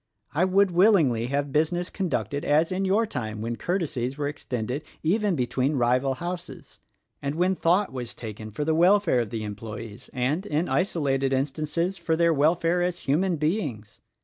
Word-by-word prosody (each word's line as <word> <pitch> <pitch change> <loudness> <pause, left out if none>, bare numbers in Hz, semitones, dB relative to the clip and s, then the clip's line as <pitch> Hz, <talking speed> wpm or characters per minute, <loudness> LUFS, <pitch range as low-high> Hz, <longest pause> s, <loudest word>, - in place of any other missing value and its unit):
I 165 +5 +3
would 190 +1 +3
willingly 170 - +4
have 140 +2 -1
busi 155 +4 +1
ness 175 +1 -3
conducted 145 - -2
as 155 +4 +2
in 190 +1 0
your 205 +4 +3
time 110 - -4
when 115 +2 -3
courtesies 145 -7 -2
were 145 -1 -1
extended 130 -1 -4 0.2
even 200 +3 +2
between 130 +2 0
rival 130 +2 +2
houses, 175 +4 -7 0.4
and 140 +1 -2
when 180 +3 +2
thought 180 +1 +2
was 120 -2 -5
taken 110 -1 -7
for 145 +8 -3
the 160 - +2
welfare 175 -3 +4
of 115 -3 -1
the 110 0 -4
employees 105 +1 -7
and, 135 +8 -1
in 155 +1 0
isolated 140 -7 0
instances, 155 +7 -1
for 165 -1 0
their 170 0 +3
welfare 165 +4 +2
as 175 0 -1
human 170 +6 +1
beings. 150 - -2
150 Hz, 170 wpm, -26 LUFS, 125-175 Hz, 0.4 s, willingly